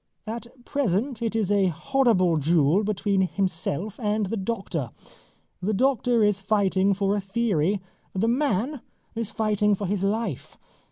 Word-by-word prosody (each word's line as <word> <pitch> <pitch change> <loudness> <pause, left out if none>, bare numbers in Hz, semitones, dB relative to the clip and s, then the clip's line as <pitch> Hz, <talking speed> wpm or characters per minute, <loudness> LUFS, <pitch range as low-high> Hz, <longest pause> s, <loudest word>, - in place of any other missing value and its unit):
At 230 +2 -5 0.2
present 245 -2 -1
it 225 -1 -1
is 210 -3 0
a 200 -2 +3
horrible 185 - +2
duel 160 +4 +3
between 200 -1 0
himself 185 +1 -2
and 210 -2 0
the 195 - -3
doctor. 190 - -3 0.7
The 205 +3 0
doctor 245 -1 +2
is 205 -2 +2
fighting 195 -1 +2
for 200 +1 +1
a 205 - -1
theory. 195 -3 0 0.3
The 195 +4 0
man 255 +1 0 0.3
is 230 -2 -3
fighting 210 -1 +1
for 200 - -4
his 195 0 -1
life. 200 - -2
205 Hz, 145 wpm, -25 LUFS, 190-225 Hz, 0.7 s, a